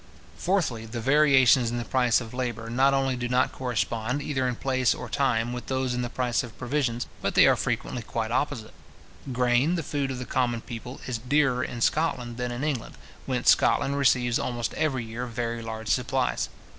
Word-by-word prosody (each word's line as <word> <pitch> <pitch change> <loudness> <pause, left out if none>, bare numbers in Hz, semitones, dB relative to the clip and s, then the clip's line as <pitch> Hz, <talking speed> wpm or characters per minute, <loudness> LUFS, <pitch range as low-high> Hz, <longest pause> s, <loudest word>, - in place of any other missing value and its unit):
Fourthly, 160 - -1
the 115 +1 -5
variations 135 -2 +5
in 120 - -3
the 120 - -3
price 125 -3 +3
of 115 -2 -8
labour 120 -3 -3
not 135 +3 +4
only 135 -1 +1
do 125 0 -3
not 125 +1 +2
correspond, 120 +1 -2
either 130 -3 -1
in 125 - -1
place 130 0 +1
or - - -7
time, 120 -4 0
with 125 - -6
those 130 -1 -1
in 125 - -1
the 120 - -3
price 125 -1 0
of 120 -3 -10
provisions, 125 -3 -1 0.2
but - - -2
they - - +7
are - - +5
frequently 125 - -2
quite 110 0 -3
opposite. 120 -4 -2 0.6
Grain, 125 +6 +2
the 170 - -2
food 140 -1 -2
of 130 - -4
the 125 - -5
common 120 -3 0
people, 120 +2 -8
is 120 -3 -3
dearer 125 0 +2
in 120 - -5
Scotland 125 -5 0
than 125 0 -2
in 120 +3 -4
England, 145 -6 -3 0.3
whence - - +4
Scotland 140 - +2
receives 125 -3 +2
almost 120 -4 -2
every 135 -7 -1
year 115 +3 -5
very 115 0 -3
large 110 -1 -6
supplies. 130 +1 0
125 Hz, 195 wpm, -26 LUFS, 120-135 Hz, 0.6 s, they